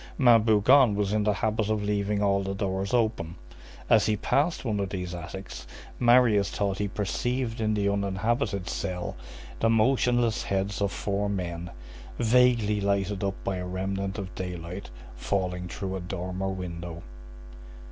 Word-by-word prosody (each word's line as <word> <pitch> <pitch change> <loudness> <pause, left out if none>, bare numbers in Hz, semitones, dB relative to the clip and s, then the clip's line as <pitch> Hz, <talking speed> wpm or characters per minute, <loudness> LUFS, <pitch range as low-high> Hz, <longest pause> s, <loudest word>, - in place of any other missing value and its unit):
Ma'am 120 -4 +6
Bougon 110 +2 +5
was 100 0 0
in 105 -1 +2
the 105 - +4
habit 110 +1 -1
of 110 -1 0
leaving 105 0 0
all 100 -1 +2
the 95 0 -3
doors 95 0 -2
open. 110 -9 0 0.5
As - - +4
he 105 -1 +1
passed 145 - 0
one 105 -4 0
of 100 -1 -1
these 90 -2 -4
attics, 90 -5 -8 0.3
Marius 120 -5 +5
thought 100 -2 -2
he 105 - 0
perceived 115 +4 -2
in 110 -1 +1
the 100 -1 +1
uninhabited 100 0 -1
cell 90 -2 -3 0.4
the 115 - +3
motionless 120 0 +2
heads 100 +1 -2
of 100 -1 +1
four 100 0 -2
men, 90 -3 -3 0.5
vaguely 115 -3 +3
lighted 100 0 0
up 100 0 -1
by 95 -1 -2
a 90 0 -4
remnant 95 +2 -3
of 95 -3 -6
daylight, 90 +1 -6 0.3
falling 90 +5 -2
through 95 +2 -4
a - - -3
dormer 90 +1 -4
window. 85 -2 -6
100 Hz, 155 wpm, -27 LUFS, 95-110 Hz, 0.5 s, Ma'am